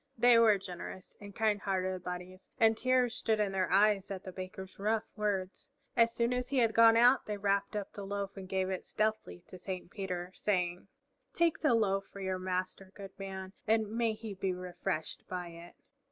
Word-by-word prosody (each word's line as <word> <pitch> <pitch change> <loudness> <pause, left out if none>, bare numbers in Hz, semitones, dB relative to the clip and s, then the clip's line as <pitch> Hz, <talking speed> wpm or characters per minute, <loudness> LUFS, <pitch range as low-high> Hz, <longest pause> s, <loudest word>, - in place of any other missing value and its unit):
They 240 0 +6
were 220 -3 +6
generous 185 0 -8
and 200 -1 -10
kind 215 -3 +1
hearted 185 -2 -1
bodies, 180 +1 -7
and 225 -1 +5
tears 255 0 +2
stood 225 -3 0
in 205 -2 +1
their 190 -2 0
eyes 200 0 +4
at 190 -2 -5
the 185 - -7
Baker's 190 +1 -8
rough 215 +2 +1
words. 200 -3 -2 0.3
As 230 0 +5
soon 235 +1 0
as 250 0 -2
he 275 - -1
had 230 -3 +3
gone 230 0 +7
out 245 +3 +5
they 210 -1 -2
wrapped 200 +1 0
up 205 -2 -4
the 200 - -7
loaf 200 0 -4
and 190 -2 -9
gave 190 0 0
it 185 - -3
stealthily 215 - -2
to 185 - -11
Saint 185 -1 -6
Peter 180 -3 -4
saying, 180 -3 -1 0.5
"Take 340 -2 +2
the 300 -6 +3
loaf 195 -3 +1
for 200 - -10
your 190 -1 -2
Master, 185 +1 -3
good 195 -2 -9
man, 190 -1 -6
and 220 -1 +2
may 230 0 +1
he 220 -1 -7
be 190 -1 -2
refreshed 180 -2 -4
by 180 -1 -4
it." 170 +1 -12
195 Hz, 195 wpm, -32 LUFS, 185-220 Hz, 0.5 s, gone